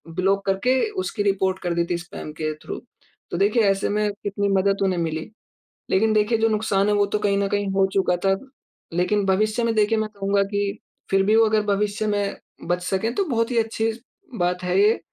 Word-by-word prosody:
Block 195 +2 +1
करके 225 +7 +2 0.2
उसकी 205 - -2
report 190 -1 +1
कर 175 -1 0
दी 170 0 +1
थी 175 - +1
स्पैम 170 -3 -8
के 155 0 -1
थ्रू। - - -5 0.5
तो - - -2
देखिए 210 +5 +3
ऐसे 195 0 -1
में 210 0 +1
कितनी 200 0 -1
मदद 195 0 +2
उन्हें 185 -2 +1
मिली। 160 -1 -3 0.6
लेकिन 220 +3 +3
देखिए 215 +2 +2
जो 225 +1 +2
नुकसान 210 -2 +1
है 210 - +2
वो 205 0 +3
तो 210 +1 -1
कहीं 205 -1 +1
न 200 - +1
कहीं 205 0 0
हो 195 0 +3
चुका 190 -2 +2
था। 195 0 +4 0.6
लेकिन 195 +4 +1
भविष्य 215 +5 +1
में 230 0 +1
देखिए 215 +1 +3
मैं 215 0 -2
कहूँगा 200 0 +1
कि, 200 +1 -2 0.3
फिर 195 0 +4
भी 215 +2 +4
वो 225 - +6
अगर 215 0 +2
भविष्य 210 +1 0
में 205 -1 -1 0.3
बच 175 +1 0
सके 190 +5 -1
तो 395 - +1
बहुत 230 -1 0
ही 240 - 0
अच्छी 225 0 0
स 225 - -12 0.4
बात 180 +1 0
है 180 +1 +1
ये। 215 +2 +4
200 Hz, 215 wpm, -23 LUFS, 190-215 Hz, 0.6 s, वो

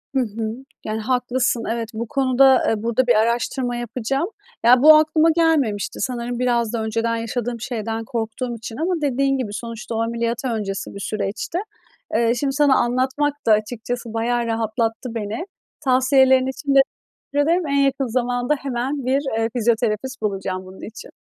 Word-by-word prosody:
Hı - - +4
hı. 220 -1 -3 0.3
Yani, 215 +1 -2
haklısın 245 0 0
evet, 230 -1 -3
bu 230 +1 -4
konuda, 265 0 +4
eee, 220 -1 0
burada 235 +2 +1
bir 245 - +5
araştırma 240 +3 0
yapacağım. 250 - -2 0.4
Ya, 245 +1 +7
bu 310 +1 +10
aklıma 310 +1 +4
gelmemişti, 295 -12 +1
sanırım 245 -1 -3
biraz 240 -2 +1
da 225 -2 -1
önceden 230 +1 -1
yaşadığım 235 +1 -3
şeyden 225 -1 -3
korktuğum 235 +2 -3
için 225 0 -8
ama 335 +2 -1
dediğin 275 -1 +1
gibi, 220 -6 -3
sonuçta 230 +1 -6
o 225 - 0
ameliyat 235 +2 -2
öncesi 210 -5 -3
bir 200 - -6
süreçti. 205 - -3 0.6
Eee, 230 +1 +3
şimdi 275 0 0
sana 285 -1 +4
anlatmak 260 +4 +1
da 225 - +4
açıkçası 225 +2 -1
bayağı 235 +1 0
rahatlattı 225 +1 -2
beni. 220 - -3 0.3
Tavsiyelerin 260 -1 +4
için 275 +1 -2
de - - +8 0.5
teşekkür 290 +2 +2
ederim. 345 -1 +2
En 280 0 +1
yakın 275 -1 0
zamanda 245 +3 0
hemen 270 0 -3
bir, 265 +2 +2 0.2
eee, 225 0 +1
fizyoterapist 235 +2 0
bulacağım 190 -3 -3
bunun 185 +1 -12
için. 225 - -11
240 Hz, 160 wpm, -21 LUFS, 225-265 Hz, 0.6 s, bu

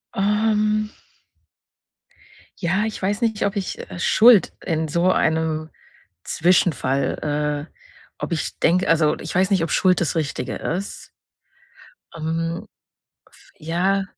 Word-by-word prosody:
Ähm 210 +1 +1 1.7
ja, 190 +4 +1
ich 220 - -5
weiß 200 +4 -1
nicht, 220 -3 0
ob 200 +1 -1
ich, 195 -2 -4
äh, 180 - -8
Schuld 225 +2 +5
in 160 -3 -1
so 170 +4 +2
einem 160 0 0 0.6
Zwischenfall 150 -2 0
äh, - - -40 0.5
ob 170 - -2
ich 160 - -4
denke 180 +3 +2
also 160 -2 +3
ich 160 - -6
weiß 185 +2 +2
nicht, 190 -4 +3
ob 165 - -3
Schuld 185 -1 +3
das 165 -3 -1
Richtige 140 -5 -3
ist. 190 +4 -5 1.1
Ähm, 165 +1 -3 0.7
f - - -21
ja 180 +5 0
175 Hz, 125 wpm, -22 LUFS, 160-200 Hz, 1.7 s, Schuld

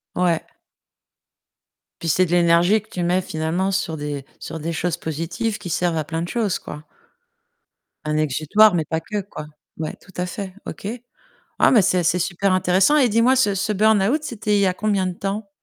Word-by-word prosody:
Ouais. 175 -3 +1 1.6
Puis 165 - -2
c'est 185 +5 +3
de 170 - -6
l'énergie 175 +4 +4
que 215 - -26
tu 180 - -3
mets 180 +2 +2
finalement 165 +4 -2
sur 165 -4 -2
des 145 -2 -5
sur 160 - -7
des 165 +2 -3
choses 170 +2 -1
positives 170 +8 -3
qui 185 - -8
servent 170 0 0
à 155 - 0
plein 165 +2 -4
de 175 - -3
choses, 220 -6 -1
quoi. 150 - -9 1.2
Un 150 0 0
exutoire, 155 +8 +4
mais 165 - +1
pas 160 +2 -2
que 205 +5 -4
quoi. 155 -6 -9 0.3
Ouais, 155 -1 -4
tout 190 - -17
à 180 - -1
fait, 190 0 -6
OK. - - -7 0.7
Ah - - +5
mais 225 -5 +6
c'est 185 -1 +2
c'est 180 +2 +2
super 185 +2 0
intéressant 185 - +3
et 270 -5 +4
dis-moi 230 +4 +3
ce 210 -6 +3
ce 195 +3 -1
burn-out, 215 +6 +3
c'était 210 -5 -1
il - - +3
y 195 - +3
a 185 - +1
combien 200 -2 0
de 185 - -2
temps? 200 +3 -4
185 Hz, 195 wpm, -21 LUFS, 165-205 Hz, 1.6 s, mais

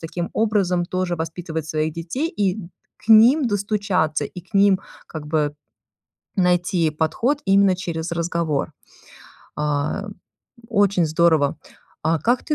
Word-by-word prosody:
таким 170 +1 -4
образом 200 -5 +1
тоже 185 0 -2
воспитывать 160 -1 -5
своих 155 0 -1
детей, 175 - -3
и 200 - -1
д 180 -5 -8 0.3
к - - -21
ним 240 +6 +7
достучаться, 200 -8 0
и 180 - -8
к 185 - -30
ним, 195 -1 +4 0.3
как 155 -2 -8
бы, 150 -1 0 0.8
найти 180 -3 +2
подход 160 - 0
именно 195 -1 +4
через 170 -2 -4
разговор. 170 -3 -1 0.9
А, 150 +6 -1 0.6
очень 200 -5 +2
здорово. 160 -3 +2 0.5
А 165 -1 +1
как 240 +2 +1
ты 300 - 0
175 Hz, 130 wpm, -22 LUFS, 160-200 Hz, 0.9 s, ним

